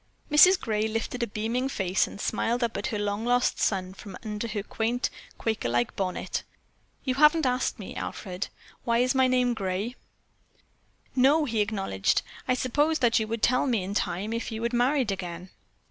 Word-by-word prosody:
Mrs. 360 Hz, +5 st, +7 dB
Gray 215 Hz, -1 st, 0 dB
lifted 225 Hz, +3 st, -3 dB
a 235 Hz, -, +1 dB
beaming 230 Hz, +5 st, -1 dB
face 190 Hz, -6 st, +1 dB
and -, -, -10 dB
smiled 235 Hz, +4 st, 0 dB
up 235 Hz, -1 st, -1 dB
at 200 Hz, -, -2 dB
her 215 Hz, -, -2 dB
long 205 Hz, +1 st, -2 dB
lost 245 Hz, +1 st, +2 dB
son 185 Hz, -2 st, 0 dB
from 195 Hz, -1 st, -10 dB
under 210 Hz, +1 st, -3 dB
her 210 Hz, -2 st, -3 dB
quaint 230 Hz, +4 st, -1 dB, 0.3 s
Quaker 220 Hz, -, -1 dB
like 120 Hz, 0 st, 0 dB
bonnet. 185 Hz, -2 st, -2 dB, 0.6 s
"You 260 Hz, -, 0 dB
haven't 300 Hz, +3 st, +5 dB
asked 255 Hz, 0 st, 0 dB
me, 200 Hz, -, -8 dB
Alfred, 185 Hz, -1 st, -4 dB, 0.4 s
why 235 Hz, +1 st, +2 dB
my 260 Hz, -1 st, +4 dB
name 250 Hz, -1 st, +2 dB
is -, -, +1 dB
Gray?" 200 Hz, +3 st, -2 dB, 1.2 s
"No," 280 Hz, +4 st, +4 dB
he 225 Hz, -5 st, 0 dB
acknowledged, 195 Hz, -, 0 dB, 0.2 s
"I 255 Hz, -, +3 dB
supposed 290 Hz, +5 st, +1 dB
that 230 Hz, -1 st, +4 dB
you 220 Hz, -, -2 dB
would 230 Hz, 0 st, -4 dB
tell 255 Hz, +3 st, +3 dB
me 230 Hz, -7 st, +1 dB
in 195 Hz, +2 st, -4 dB
time 205 Hz, +2 st, -1 dB
if 230 Hz, +1 st, -3 dB
you 220 Hz, +1 st, -4 dB
had 235 Hz, +1 st, -1 dB
married 250 Hz, -1 st, +2 dB
again." 180 Hz, -1 st, -6 dB
225 Hz, 180 wpm, -27 LUFS, 200-250 Hz, 1.2 s, Mrs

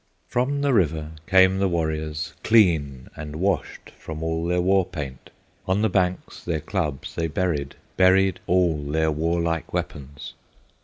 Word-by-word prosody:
From 140 Hz, +4 st, 0 dB
the 140 Hz, -2 st, +2 dB
river 80 Hz, -6 st, +1 dB, 0.2 s
came 95 Hz, 0 st, +5 dB
the 100 Hz, -, +2 dB
warriors, 80 Hz, -2 st, -2 dB
Clean 80 Hz, -, +3 dB
and 75 Hz, -1 st, -7 dB
washed 90 Hz, 0 st, -2 dB
from 80 Hz, 0 st, -7 dB
all 80 Hz, +1 st, -1 dB
their 90 Hz, 0 st, +1 dB
war 95 Hz, +2 st, +3 dB
paint; 70 Hz, -7 st, -7 dB, 0.4 s
On 95 Hz, +3 st, +1 dB
the 110 Hz, -, +3 dB
banks 90 Hz, -1 st, -1 dB
their 85 Hz, -3 st, -1 dB
clubs 75 Hz, -3 st, -3 dB
they 85 Hz, -, -1 dB
buried, 75 Hz, -3 st, -2 dB, 0.2 s
Buried 95 Hz, 0 st, +4 dB
all 90 Hz, -3 st, +3 dB
their 80 Hz, +2 st, 0 dB
warlike 85 Hz, +1 st, -1 dB
weapons. 75 Hz, -5 st, -5 dB
85 Hz, 145 wpm, -24 LUFS, 75-95 Hz, 0.4 s, came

